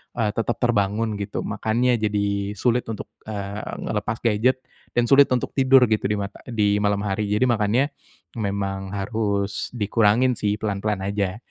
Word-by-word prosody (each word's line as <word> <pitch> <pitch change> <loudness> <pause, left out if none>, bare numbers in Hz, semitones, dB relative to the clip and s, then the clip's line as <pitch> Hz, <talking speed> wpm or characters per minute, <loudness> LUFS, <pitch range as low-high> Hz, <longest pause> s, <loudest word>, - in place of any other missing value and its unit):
eee, 110 -3 +1
tetap 115 +2 -1
terbangun 105 -1 +1
gitu. 100 0 -3
Makannya 115 +3 +1
jadi 100 -1 -1
sulit 120 +3 +1
untuk, 110 -2 -6 0.2
eee, 100 -1 -5
melepas 110 - -2
gadget. 120 +4 +2 0.3
Dan 120 -1 +1
sulit 140 +1 +8
untuk 125 - 0
tidur 130 -2 +6
gitu 110 -2 +1
dimata 100 0 -2
di 105 -4 +1
malam 105 -1 +1
hari. 105 0 -1
Jadi 105 +4 +1
makannya, 115 +5 +2 0.5
memang 100 -2 -3
harus 100 -1 -1
dikurangin 115 +3 +3
sih 105 -1 0
pelan-pelan 105 -1 -1
aja, 100 -1 -1
105 Hz, 145 wpm, -23 LUFS, 100-115 Hz, 0.5 s, sulit